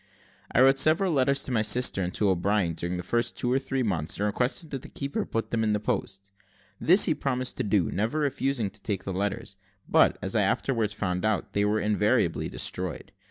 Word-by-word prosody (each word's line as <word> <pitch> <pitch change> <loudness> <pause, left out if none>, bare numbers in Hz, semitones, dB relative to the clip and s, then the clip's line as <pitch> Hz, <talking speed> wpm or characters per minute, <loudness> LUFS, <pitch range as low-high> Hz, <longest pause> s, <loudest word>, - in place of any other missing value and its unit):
I 120 - +3
wrote 135 +1 +5
several 165 +5 +3
letters 140 0 +2
to - - -5
my 115 -3 +2
sister 105 -1 +2
and 90 -1 -2
to 105 - +2
O'Brien 95 -1 +1
during 85 +2 -4
the 90 - -5
first 120 +3 -1
two 125 0 0
or 135 - +2
three 135 -1 -2
months, 85 -8 -1
and 100 - -1
requested 125 - -1
the 135 - -3
keeper 140 0 -4
to - - -1
put 115 - -3
them 115 -1 0
in 105 -1 +1
the 105 - 0
post. 100 -1 -4 0.5
This 185 +5 +6
he 160 - +2
promised 130 -3 -2
to - - -1
do, 100 -5 +1
never 110 +9 -1
refusing 135 -7 -1
to 100 +1 -8
take 100 -3 -3
the 95 - -4
letters; 100 +1 -3 0.3
but, - - +4
as - - -3
I - - +3
afterwards 115 -6 0
found 90 -2 -2
out, 110 -2 -1
they 100 0 +1
were 105 +1 +1
invariably 105 0 +1
destroyed. 90 -3 -3
110 Hz, 215 wpm, -27 LUFS, 100-130 Hz, 0.5 s, This